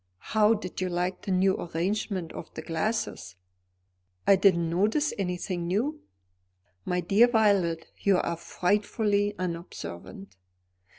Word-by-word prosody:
How 220 +1 +5
did 185 -3 -6
you 185 - 0
like 180 +1 -2
the 195 - -4
new 190 +1 +3
arrangement 180 +1 -2
of - - -8
the - - -6
glasses?" 205 - -2 0.9
"I 200 - +7
didn't 185 -3 +3
notice 215 - +1
anything 180 -2 -2
new." 255 - -1 0.8
"My 180 0 0
dear 200 +7 +5
Violet, 200 -8 +2
you 195 -2 +3
are 170 - -1
frightfully 205 +3 0
unobservant." 100 - -6
185 Hz, 120 wpm, -27 LUFS, 170-210 Hz, 0.9 s, I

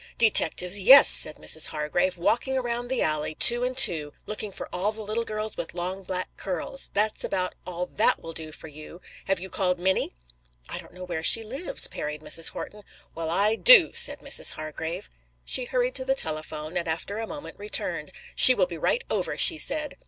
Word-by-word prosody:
"Detectives, 205 -4 +4
yes!" 265 +9 +7
said 155 - +6
Mrs. 160 - +2
Hargrave. 165 +5 -3
"Walking 245 +9 -2
around 240 -1 -4
the 260 0 -2
alley, 155 0 -2
two 240 +7 +5
and 255 0 -4
two, 165 - +4
looking 210 -1 -6
for - - -8
all 195 +4 -2
the 220 0 -9
little 215 +3 -4
girls 215 -1 -6
with 170 - -8
long, 180 +2 -6
black 185 -1 -5
curls. 190 +8 -2
That's 210 +1 0
about 185 -1 -3
all 180 0 -5
that 215 +4 0
will 165 - -11
do 160 -1 -6
for 160 - -11
you. 155 +3 -13 0.3
Have 195 -2 -1
you 190 - -8
called 180 -1 -2
Minnie?" 185 - -2 0.5
"I - - -7
don't - - -15
know 180 - -11
where 170 -3 -6
she 225 +7 +5
lives," 275 - -3
parried 150 0 -8
Mrs. 165 +1 0
Horton. 210 - -10 0.3
"Well, 165 0 -6
I 200 +6 0
do!" - - +6
said - - +1
Mrs. - - +1
Hargrave. 155 - -8 0.4
She 255 - 0
hurried - - -3
to - - -4
the - - -2
telephone, 155 - -5
and 170 -1 -4
after 170 +6 -5
a 225 - -6
moment 290 -4 -11
returned. 210 +1 -4 0.2
"She 255 - +7
will 185 - +1
be 170 -2 -10
right 480 - -2
over," - - -4
she 325 -3 +6
said. 305 -1 -1
190 Hz, 195 wpm, -24 LUFS, 165-235 Hz, 0.5 s, yes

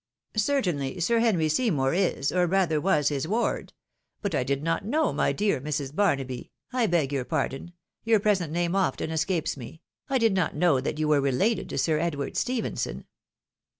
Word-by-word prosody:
" - - -57
Certainly, 185 - 0
Sir 230 +7 +2
Henry 200 -9 +2
Seymour 155 - +1
is, 180 -6 +1
or 180 -1 +2
rather 170 -4 +2
was, 150 -6 +2
his 145 0 -2
ward: 225 +6 -1 0.5
but 200 - -1
I - - +1
did 140 +2 -1
not 165 +3 0
know, 300 +9 +1
my - - +1
dear 200 -10 0
Mrs. 145 -1 -3
Barnaby 135 -11 0
— - - -34
I 250 -3 +2
beg 155 -6 +1
your 135 -2 0
pardon, 135 +6 -3 0.3
your 225 -1 +4
present 195 -6 +1
name 175 +2 0
often 175 -4 0
escapes 165 +1 0
me 140 +4 -10
— - - -42
I 270 - +2
did 225 -4 +3
not 180 -6 0
know 150 -4 +3
that 145 - -3
you 155 0 0
wererelated 150 - +1
to - - -4
Sir 155 -2 +1
Edward 145 -4 -2
Stephenson." 250 -2 -2
170 Hz, 185 wpm, -26 LUFS, 145-205 Hz, 0.5 s, your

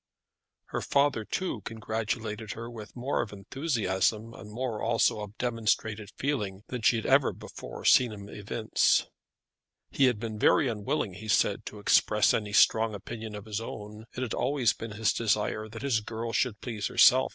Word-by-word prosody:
Her - - -2
father, 140 -5 +2
too, 150 - -3
congratulated 110 0 -4
her 115 +1 -7
with 110 -2 -10
more 125 +3 -1
of 120 - -5
enthusiasm, 110 - -1
and 105 - -11
more 115 -1 -3
also 115 -1 +2
of 105 0 -8
demonstrated 110 -3 -1
feeling 105 -9 -2
than 125 -2 -4
she 115 - +4
had 110 - -2
ever - - +4
before - - -9
seen 125 -3 +6
him 100 -1 -9
evince. 105 +2 +1 0.9
He 135 - +3
had 125 -5 +2
been 110 -2 -5
very 135 - +4
unwilling, 115 0 -2
he 105 +4 -9
said, 105 - +2
to 105 - -7
express 105 +1 +4
any 105 -2 -1
strong 110 +1 +4
opinion 110 +1 -7
of 105 0 -8
his 110 0 -3
own. 105 -1 -8
It 125 - -4
had 120 - -3
always 130 -4 +2
been 115 -1 -7
his 110 +1 +1
desire 110 -1 0
that 115 +1 -8
his 130 -5 +2
girl 115 +1 -5
should 110 -5 0
please 110 -5 -3
herself. 65 -2 +6
110 Hz, 175 wpm, -29 LUFS, 105-120 Hz, 0.9 s, seen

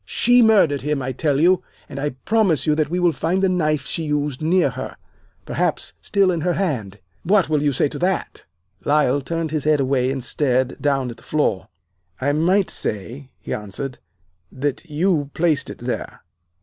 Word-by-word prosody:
She 245 0 +3
murdered 200 - +4
him, 150 0 -1
I 130 - -2
tell 140 +2 0
you, 180 +3 +4 0.3
and 140 - -7
I 145 +2 0 0.2
promise 195 - +2
you 150 - +3
that 150 -1 0
we 175 - -1
will 175 -1 +4
find 180 +4 -1
the - - +5
knife 155 -6 0
she 165 - -3
used 150 -2 -1
near 175 +4 +2
her - - -6 0.5
perhaps - - -1
still 195 -2 +2
in 170 -2 -2
her 175 +2 +1
hand. 125 - -2 0.2
What 195 0 +2
will 150 -2 +2
you 145 -1 +2
say 135 - +2
to - - -7
that?' 185 +1 -1 0.4
"Lyle 145 -2 +2
turned 165 +2 -3
his 155 -2 -2
head 155 -1 +3
away 130 -1 +1
and 135 -1 -3
stared 130 -1 0
down 135 -4 0
at 115 - -11
the - - -17
floor. 150 -11 0 0.5
'I 140 +2 +1
might 180 +6 +2
say,' 120 +7 -5
he - - -5
answered, 105 +6 -5 0.5
'that 145 +4 -3
you 150 -2 +1
placed 160 -4 +1
it - - -7
there. - - -5
150 Hz, 190 wpm, -21 LUFS, 135-175 Hz, 0.5 s, the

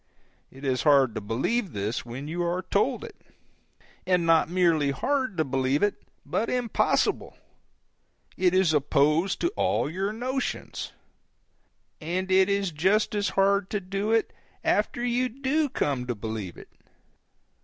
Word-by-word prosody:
It 135 +2 -11
is 130 -2 +1
hard 140 -5 +4
to - - -4
believe 150 - -1
this, 105 +3 -2
when 130 +5 -6
you 170 +3 -3
are 175 +2 -1
told 245 - +1
it. 450 -3 -11 0.8
And 180 -2 +2
not 165 -1 +4
merely 170 -5 +2
hard 255 - -1
to 160 - +1
believe 135 +4 0
it, 205 - +3 0.3
but 230 - -1
impossible; 245 -2 0 1.0
it 185 -1 +2
is 185 -4 +3
opposed 150 +5 +2
to 345 - +2
all 400 - 0
your 190 +6 -2
notions. 255 +4 -4 1.1
And 185 +4 -2
it 190 +1 +5
is 200 -2 0
just 190 +9 +1
as 205 -1 0
hard 195 0 +3
to 210 - -1
do 195 +3 -3
it, 225 -1 +1 0.3
after 240 - 0
you 245 +1 +1
do 275 +4 0
come 135 - -1
to 120 - -2
believe 110 -4 -5
it. - - -13
185 Hz, 145 wpm, -26 LUFS, 145-215 Hz, 1.1 s, it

